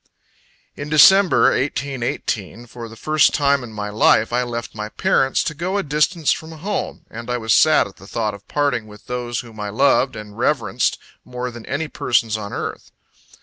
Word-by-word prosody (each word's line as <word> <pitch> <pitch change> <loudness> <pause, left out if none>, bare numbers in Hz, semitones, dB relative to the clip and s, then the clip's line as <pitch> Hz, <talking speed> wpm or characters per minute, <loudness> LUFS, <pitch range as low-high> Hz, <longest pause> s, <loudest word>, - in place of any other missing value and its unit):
In 145 +1 -6
December, 180 +6 +6
1818, 120 -6 -3
for 115 -1 -9
the 115 - -12
first 155 +6 +2
time 140 -2 +2
in 120 - -9
my 105 -1 -5
life, 110 +2 +3
I 125 - +2
left 120 -1 -5
my 105 0 -5
parents, 135 +4 +1
to 165 - -3
go 180 +6 -2
a 200 - 0
distance 150 +2 +1
from 160 +1 -4
home; 190 +6 -4
and 115 +2 -8
I 125 - 0
was 110 -2 +1
sad 155 -1 +5
at 100 - -12
the 95 - -14
thought 110 -1 -2
of 100 0 -13
parting 135 -7 -1
with 105 0 -15
those 120 -1 -3
whom 115 -3 -14
I 105 0 -3
loved 130 +3 +2
and 105 -1 -9
reverenced 120 +1 0 0.3
more 125 0 -5
than 120 -1 -11
any 145 +4 -2
persons 115 -6 0
on 105 -2 -5
earth. - - -5
125 Hz, 190 wpm, -20 LUFS, 110-145 Hz, 0.3 s, December